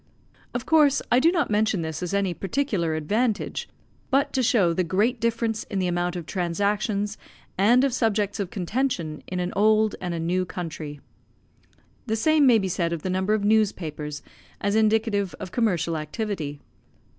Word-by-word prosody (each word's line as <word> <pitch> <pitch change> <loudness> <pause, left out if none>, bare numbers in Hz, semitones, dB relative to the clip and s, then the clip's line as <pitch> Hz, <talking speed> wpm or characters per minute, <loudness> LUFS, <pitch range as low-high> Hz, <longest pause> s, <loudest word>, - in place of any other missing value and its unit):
Of 245 - -2
course, 300 -3 +4
I 245 - +6
do 325 +6 +4
not 345 -10 0
mention 210 -4 +1
this 160 0 -4
as 180 - -3
any 200 -2 0
particular 195 - -1
advantage, 215 +9 -1 0.4
but 280 +1 +2
to 260 - +1
show 220 -8 +3
the 185 - +1
great 210 +8 +1
difference 230 -1 -1
in 200 - -5
the 185 - +1
amount 175 0 -1
of 175 -2 -5
transactions, 205 +4 -1 0.4
and 235 +7 +4
of 275 -3 +1
subjects 210 -4 0
of 195 -3 -2
contention, 185 - -2
in 185 - -3
an 180 0 -2
old 215 +1 +3
and 175 -2 -3
a - - -3
new 175 +3 0
country. 160 -5 -6 1.1
The 220 - 0
same 300 +4 +4
may 240 -3 +6
be 195 -3 -1
said 170 -2 -1
of 165 - -5
the 185 - -1
number 190 +3 +1
of 210 - -2
newspapers, 165 -9 0 0.4
as 200 +1 0
indicative 215 -3 +2
of 180 - -7
commercial 175 -8 0
activity. 155 -2 -4
200 Hz, 170 wpm, -25 LUFS, 175-225 Hz, 1.1 s, I